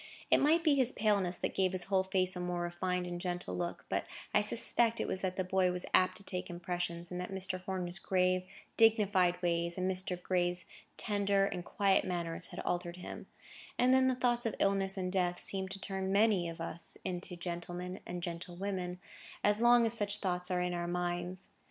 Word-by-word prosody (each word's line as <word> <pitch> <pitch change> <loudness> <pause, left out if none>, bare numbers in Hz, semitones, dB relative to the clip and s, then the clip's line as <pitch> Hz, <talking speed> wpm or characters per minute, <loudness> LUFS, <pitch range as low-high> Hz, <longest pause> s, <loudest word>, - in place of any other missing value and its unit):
It - - +7
might 320 +4 +4
be 310 -3 +5
his 260 -3 +3
paleness 200 -6 +1
that - - -2
gave 190 -1 +1
his 185 -1 +3
whole 190 0 +2
face 185 -1 +1
a - - -4
more 180 0 -2
refined 180 +1 -1
and 175 0 -5
gentle 180 -1 -3
look; 175 -1 -4
but - - -1 0.3
I - - +5
suspect 230 -1 +1
it - - -1
was 185 - -1
that 185 -1 -1
the 185 - 0
boy 185 0 +2
was 180 0 -3
apt 185 0 +4
to - - -8
take 185 -1 -4
impressions, 175 0 -3
and 180 0 -3
that 180 - -5
Mr. 185 -1 -2
Horner's 185 -1 -4
grave, 185 -1 +2 0.4
dignified 205 -6 +4
ways, 170 0 +1
and 185 0 0
Mr. 185 -1 -2
Gray's 180 -1 0 0.3
tender 200 -2 +2
and 180 -2 -3
quiet 195 +2 +2
manners, 170 -2 -3
had - - -7
altered 175 0 -2
him; 180 - -8 0.5
and 250 +1 +4
then 260 0 +5
the 260 - +2
thoughts 240 -1 +1
of 225 - -3
illness 195 0 +2
and 185 -1 -2
death 180 -2 +1
seem 190 -1 -2
to 195 +1 -5
turn 190 -1 -3
many 200 -4 +3
of 165 - -8
us 165 0 -5
into 180 0 -3
gentlemen, 175 +1 -4
and 175 0 -6
gentlewomen, 180 +1 -4 0.5
as 205 +1 +3
long 240 0 +6
as 225 - +3
such 205 -2 +3
thoughts 180 -3 -1
are 180 -1 +1
in 180 0 -1
our 175 0 -2
minds. 175 +1 -3
185 Hz, 200 wpm, -33 LUFS, 175-195 Hz, 0.5 s, It